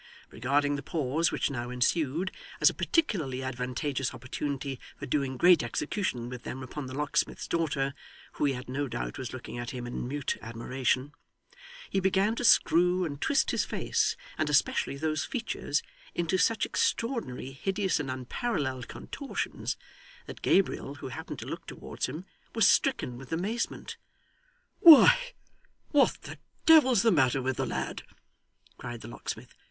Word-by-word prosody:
Regarding 145 +4 +1
the - - -5
pause 155 +2 0
which - - 0
now 120 -2 -4
ensued, 155 +7 0 0.3
as - - +6
a - - -12
particularly 155 - 0
advantageous 130 +1 -2
opportunity 135 +2 -4 0.2
for 145 - -6
doing 135 -1 -1
great 175 +3 +6
execution 120 - -2
with 125 0 -7
them 130 +2 -6
upon 135 +2 -6
the 130 - -7
locksmith's 150 0 -1
daughter 145 -5 0 0.4
(who - - -1
he 140 - +2
had 125 +1 -7
no 140 +3 -2
doubt - - -4
was 125 -4 -5
looking 120 -1 -7
at 120 0 -4
him 125 -2 -5
in 120 0 -4
mute 140 +1 -2
admiration), 130 +4 -1 0.7
he 195 - 0
began 195 +3 +2
to - - -2
screw 180 -4 +5
and 145 -2 -5
twist 280 - +2
his - - +1
face, - - 0 0.2
and 155 -1 +1
especially 140 -1 +2
those 155 0 -1
features, 225 - -2 0.3
into 175 +1 0
such 220 +3 +2
extraordinary, 230 - -1
hideous, 190 +7 -1
and 145 -2 -3
unparalleled 130 - -2
contortions, 280 -2 -4 0.5
that - - -9
Gabriel, 180 -7 +1
who 145 - -7
happened 160 +6 -6
to - - -7
look - - -6
towards - - -4
him, 155 +8 -7 0.3
was 225 -4 +5
stricken 125 - +2
with 135 - -12
amazement. 205 +9 -3 0.8
'Why, 325 -4 +10 0.8
what 290 -2 +4
the - - -9 0.3
devil's 260 -10 +7
the 230 - +5
matter 135 -4 +3
with 130 0 -1
the - - -1
lad?' - - -3 0.8
cried 120 -2 -6
the - - -9
locksmith. - - -7
145 Hz, 155 wpm, -29 LUFS, 130-180 Hz, 0.8 s, Why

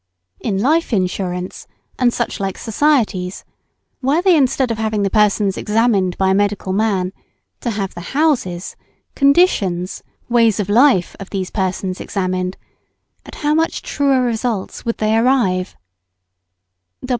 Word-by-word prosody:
In 200 -4 -2
Life 305 +5 +1
Insurance 185 -1 -2 0.3
and 250 -2 +3
such 235 -1 -3
like 195 -1 -3
societies, 220 -7 0 0.6
were 275 +5 +2
they 365 -1 +4
instead 265 -3 +2
of 225 - -3
having 215 -2 0
the 195 - 0
person 210 -1 +3
examined 210 -4 +1
by 190 0 +2
the - - +3
medical 200 -1 0
man, 195 -3 0 0.5
to 240 - -3
have 200 -3 -3
the 175 +10 -7
houses, 235 - 0 0.4
conditions, 215 - +2 0.3
ways 230 -4 +3
of 205 -1 -2
life, 230 -4 +4
of 195 - -8
these 190 -2 -4
persons 190 -1 -2
examined, 185 -1 -2 0.7
at - - -10
how 300 - +3
much 325 +1 0
truer 275 -3 +1
results 230 -4 -2
would 230 - -2
they 215 0 +1
arrive! 225 -7 +1
210 Hz, 135 wpm, -18 LUFS, 190-250 Hz, 0.7 s, they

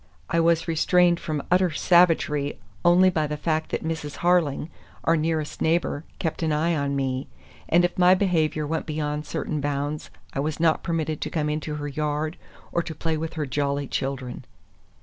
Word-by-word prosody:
I 170 - +3
was 165 0 +3
restrained 175 +1 +3
from 150 -3 -3
utter 180 0 +4
savagery 155 -3 +3 0.3
only 180 +2 +6
by 155 -3 0
the 150 0 -3
fact 155 +1 -1
that - - -2
Mrs. 160 -2 -4
Harling, 170 -5 +2 0.4
our 165 - +3
nearest 155 -1 -1
neighbor, 160 -2 +1
kept 160 -1 -3
an 160 -1 +1
eye 160 +3 +1
on 140 -1 -1
me, 130 -1 -1 0.4
and 175 +2 +5
if 175 - -2
my 180 +1 +7
behavior 160 -5 +1
went 160 +2 -2
beyond 150 -1 -2
certain 150 -2 -3
bounds 145 +1 -2 0.2
I - - -2
was 150 +2 -2
not 160 -1 +3
permitted 160 -2 -2
to - - -2
come 150 -2 -1
into 150 0 -3
her 145 -1 -4
yard 150 +2 -2 0.3
or 170 - +1
to 160 -1 -7
play 160 +1 -1
with 160 +2 -4
her 155 -2 -1
jolly 140 +1 -1
children. 130 -2 -3
155 Hz, 180 wpm, -25 LUFS, 145-165 Hz, 0.4 s, my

